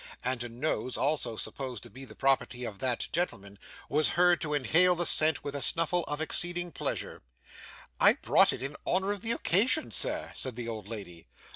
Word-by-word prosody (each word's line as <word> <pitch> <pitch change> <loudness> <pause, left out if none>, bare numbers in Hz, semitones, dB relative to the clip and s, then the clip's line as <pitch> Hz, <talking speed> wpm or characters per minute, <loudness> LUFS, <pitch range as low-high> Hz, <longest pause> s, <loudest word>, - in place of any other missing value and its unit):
and 125 -1 -2
a 120 - -7
nose, 125 +1 -4
also 135 -5 -1
supposed 125 +1 -7
to 120 - -12
be 130 +6 -12
the - - -14
property 130 -2 0
of 105 -4 -7
that 125 -1 -1
gentleman, 100 - -4 0.3
was 155 +1 +1
heard 175 -1 +3
to 150 - -4
inhale 160 +6 +4
the 175 0 -1
scent 155 -3 +5
with 145 - -6
a 140 - -3
snuffle 165 +3 +2
of 145 0 -4
exceeding 175 +2 -1
pleasure. - - -4 0.8
'I - - +6
brought - - +3
it - - -6
in 140 +1 -6
honour 190 +2 0
of 205 -2 -5
the 225 - -2
occasion, 235 - +2
Sir,' - - +2
said 130 -3 -3
the 120 -1 -7
old 110 -3 -7
lady. 95 -7 -10
140 Hz, 190 wpm, -28 LUFS, 120-175 Hz, 0.8 s, I